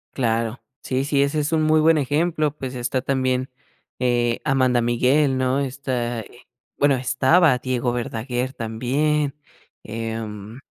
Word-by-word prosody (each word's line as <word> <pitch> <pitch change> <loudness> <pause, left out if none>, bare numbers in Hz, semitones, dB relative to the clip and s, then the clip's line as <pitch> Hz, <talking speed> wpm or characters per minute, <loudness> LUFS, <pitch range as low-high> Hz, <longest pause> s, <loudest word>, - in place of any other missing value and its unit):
Claro. 115 -1 -1 0.2
Sí, 130 +1 -1
sí, 140 -1 +2
ese 140 +2 0
es 150 +1 -1
un 155 -1 +2
muy 155 0 +4
buen 160 +1 +5
ejemplo, 150 +1 0
pues, 130 -3 -6
está 125 +1 -1
también, 130 -1 0 0.5
eh, 120 -2 +1
Amanda 130 -3 +2
Miguel, 130 +4 +2
¿no? 130 +1 +1
Está 130 -3 -2
eh, 120 +3 -16 0.3
bueno 140 -1 +3
estaba 130 +4 +3
Diego 125 -1 -1
Verdaguer, 120 +2 -3
también. 140 +6 -1 0.5
Em, 110 0 -6
130 Hz, 135 wpm, -22 LUFS, 120-140 Hz, 0.5 s, buen